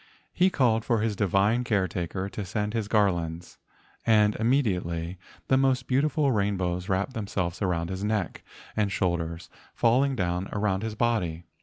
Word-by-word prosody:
He 185 +1 +4
called 115 -9 +2
for 115 -3 +1
his 110 -2 0
divine 100 +5 +2
caretaker 95 -4 -1
to 100 +1 -5
send 105 +3 -2
his 110 -3 -1
garlands, 85 -6 0 0.4
and 105 -2 +4
imme¬ 125 +7 +2
diately 90 -4 -2 0.3
the 130 - +4
most 130 -2 +2
beautiful 140 +2 +2
rainbows 95 -4 -1
wrapped 95 +7 0
themselves 95 -5 -3
around 85 -2 -1
his 95 +1 -4
neck 105 -5 -2 0.3
and 105 -2 +1
shoulders, 85 -3 -1 0.3
fall¬ 120 +3 +4
ing 140 -1 0
down 90 -2 -1
around 100 -2 0
his 110 -1 -4
body. 100 -8 0
100 Hz, 155 wpm, -27 LUFS, 90-115 Hz, 0.4 s, He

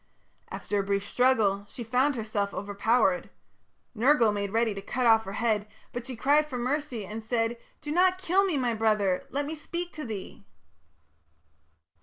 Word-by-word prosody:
After 205 - -2
a - - 0
brief 200 0 -1
struggle, 205 -5 +2
she 240 - -7
found 255 +5 +1
herself 215 -3 -2
overpowered. 200 -1 +1 0.6
Nergal 240 -1 +4
made 200 -1 -2
ready 225 0 +1
to 195 - -6
cut 245 +5 -2
off 225 -1 +5
her 195 - -6
head, 215 -2 0 0.3
but 245 +1 -5
she 260 - -5
cried 290 +6 +3
for 260 -4 -5
mercy 255 -3 -2
and 215 +4 -6
said: 225 +1 0 0.3
"Do 295 - -5
not 365 +3 +4
kill 375 +1 +2
me, 370 -7 0
my 245 -3 0
brother! 215 -4 +1
Let 285 +1 -1
me 305 - -4
speak 345 +3 -5
to 310 - -6
thee." 210 -4 -7
230 Hz, 170 wpm, -28 LUFS, 205-280 Hz, 0.6 s, off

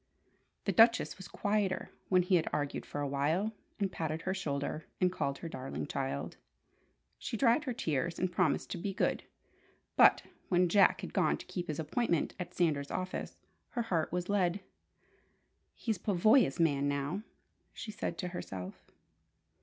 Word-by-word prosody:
The - - +2
Duchess 230 -3 +5
was 190 - -8
quieter 205 -2 -1 0.2
when 185 -1 +5
he 180 - -1
had 170 -3 +4
argued 145 -1 -2
for 145 - -4
a 145 - 0
while, 155 +10 0 0.3
and 195 -2 0
patted 160 -1 -3
her 190 - 0
shoulder, 155 -4 -2 0.2
and 180 -1 +3
called 140 -6 -2
her 170 - -6
"darling 130 - -5
child." 70 +5 -3 0.8
She 225 - -3
dried 240 +5 +3
her 255 - -1
tears, 165 - -1
and 185 -1 0
promised 175 -5 +1
to 175 - -3
"be 195 +2 -3
good" - - +1 0.7
but - - +7 0.3
when 180 -1 +3
Jack 200 +2 +5
had - - -7
gone - - +2
to - - -10
keep 175 -2 -4
his 155 - -3
appointment 170 +1 0
at 180 - -4
Sanders' 150 -5 +1
office, 185 0 -4 0.4
her 235 - +2
heart 170 -8 0
was 180 +1 -2
lead. 195 -1 +1 1.1
"He's 220 -6 -2
Pavoya's 200 - +4
man 145 -4 +3
now!" 145 +7 -1 0.5
she 215 - -7
said 205 -5 -4
to 180 - -3
herself. 95 - -7
175 Hz, 160 wpm, -32 LUFS, 150-200 Hz, 1.1 s, but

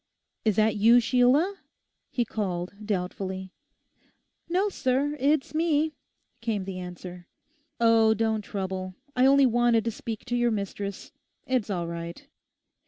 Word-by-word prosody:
'Is 215 -3 +2
that 215 0 +2
you, 230 +4 +6
Sheila?' 260 - +3 0.5
he 240 - 0
called, 185 -5 -3
doubtfully. 190 -1 -3 1.0
'No, 370 +4 +2
sir, 285 -5 0
it's 285 +2 +1
me,' 315 -1 +1 0.5
came 220 -4 -1
the 190 -1 -5
answer. 180 0 -8 0.5
'Oh, 225 -1 +5
don't 220 0 0
trouble; 190 -2 -4 0.2
I 255 +1 +5
only 275 0 +6
wanted 240 -2 +3
to 230 - 0
speak 225 0 -6
to 245 -1 -2
your 240 0 +2
mistress. 200 -2 -4 0.3
It's 255 -5 0
all 175 -4 -1
right. 170 0 -7
220 Hz, 130 wpm, -27 LUFS, 190-255 Hz, 1.0 s, you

